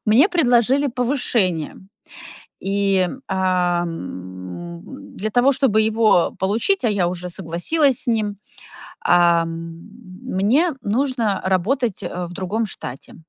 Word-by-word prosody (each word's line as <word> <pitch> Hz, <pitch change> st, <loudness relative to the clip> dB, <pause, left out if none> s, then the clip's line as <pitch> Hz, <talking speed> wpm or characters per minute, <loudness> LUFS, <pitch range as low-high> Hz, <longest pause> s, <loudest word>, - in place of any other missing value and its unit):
Мне 255 Hz, -, +5 dB
предложили 265 Hz, -, +3 dB
повышение, 235 Hz, -, -1 dB, 0.9 s
и, 195 Hz, -2 st, +2 dB, 0.2 s
ам, 170 Hz, -, -3 dB, 0.3 s
для 215 Hz, +2 st, -2 dB
того 245 Hz, +5 st, +3 dB
чтобы 250 Hz, -6 st, +2 dB
его 215 Hz, -6 st, +3 dB
получить, 225 Hz, -, 0 dB
а -, -, +4 dB
я 190 Hz, -4 st, +1 dB
уже 180 Hz, 0 st, -4 dB
согласилась 195 Hz, -, 0 dB
с -, -, -8 dB
ним, 215 Hz, -3 st, 0 dB, 0.6 s
а, 170 Hz, -1 st, +4 dB
мне 195 Hz, -, -2 dB
нужно 230 Hz, -2 st, 0 dB
работать, 200 Hz, +5 st, 0 dB
э, 180 Hz, 0 st, -4 dB
в 175 Hz, -, -10 dB
другом 200 Hz, +5 st, -2 dB
штате, 130 Hz, -9 st, -8 dB
200 Hz, 110 wpm, -21 LUFS, 175-240 Hz, 0.9 s, Мне